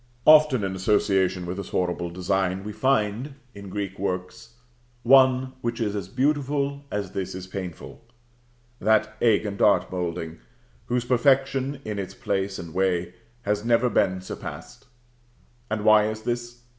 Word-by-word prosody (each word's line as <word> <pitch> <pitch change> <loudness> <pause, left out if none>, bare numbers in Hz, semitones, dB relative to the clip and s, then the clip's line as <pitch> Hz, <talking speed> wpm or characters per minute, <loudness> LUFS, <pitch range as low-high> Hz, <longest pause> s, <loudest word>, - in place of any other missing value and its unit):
Often 150 -7 +6
in 95 -1 -2
association 95 -2 +1
with 90 +2 -5
this 100 - -6
horrible 90 -1 -1
design 95 +1 -1
we 105 +1 -6
find, 115 +3 0 0.2
in 100 -1 -10
Greek 100 -1 -5
works, 95 +4 -4 0.5
one 130 0 +5
which 120 -1 -3
is 105 -3 -1
as 100 - -4
beautiful 140 +1 0
as 100 -3 -3
this 95 -2 -4
is 95 -1 -6
painful 95 +2 -8 0.8
that 110 +1 +2
egg 110 -2 +3
and 100 -1 -4
dart 105 - +3
moulding, 85 -3 -4 0.5
whose 120 0 0
perfection 135 +2 +2
in 105 -2 -3
its 95 - -6
place 100 -5 -2
and 85 -2 -8
way, 90 -1 0 0.3
has 105 0 -1
never 120 +1 +2
been 95 -2 +1
surpassed. 95 - -9 0.8
And 105 -1 -2
why 110 -1 +6
is 110 0 -5
this? 120 0 -4
105 Hz, 145 wpm, -25 LUFS, 95-120 Hz, 0.8 s, Often